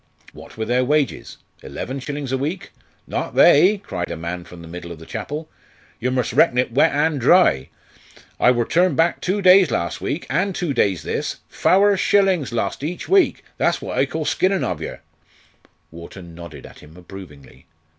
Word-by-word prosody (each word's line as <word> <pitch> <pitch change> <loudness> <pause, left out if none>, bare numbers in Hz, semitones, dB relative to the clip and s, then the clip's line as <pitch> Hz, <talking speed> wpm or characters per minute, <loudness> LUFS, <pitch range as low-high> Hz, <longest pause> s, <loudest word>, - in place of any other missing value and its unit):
What - - -14
were 110 - -2
their 125 +3 +1
wages? 145 0 -1 0.2
eleven 135 +2 -6
shillings 140 0 -5
a 135 - 0
week? 160 +8 -4 0.3
"Not - - -4
they!" 205 +3 +6
cried 90 -1 -4
a - - -5
man 85 +2 -6
from 85 -1 -12
the - - -11
middle 85 +1 -8
of 85 - -8
the 80 - -13
chapel. 145 - -6 0.5
"Yer 125 - -1
mus' 125 -2 -1
reckon 135 -7 +3
it 125 0 +1
wet 140 +7 +3
an' 150 +1 0
dry. 120 - +4 0.7
I - - +5
wor 120 -2 +2
turned 180 +6 +2
back 165 +1 +1
two 195 +2 -1
days 185 -2 +6
las' 85 - -2
week, 160 - -3
an' 195 +2 0
two 175 -5 -2
days 100 -7 0
this, - - -4
fower 200 +2 +3
shillin' 190 -4 +2
lost 120 +3 -3
each 170 +4 -5
week 390 -1 +2
that's - - +1
what - - -6
I - - +2
call - - -4
skinnin' 190 0 +1
ov 90 -4 -3
yer." - - -7 0.9
Wharton 85 +1 -11
nodded 80 -4 -11
at - - -14
him 80 +3 -16
approvingly. 75 -8 -13
130 Hz, 185 wpm, -21 LUFS, -, 0.9 s, they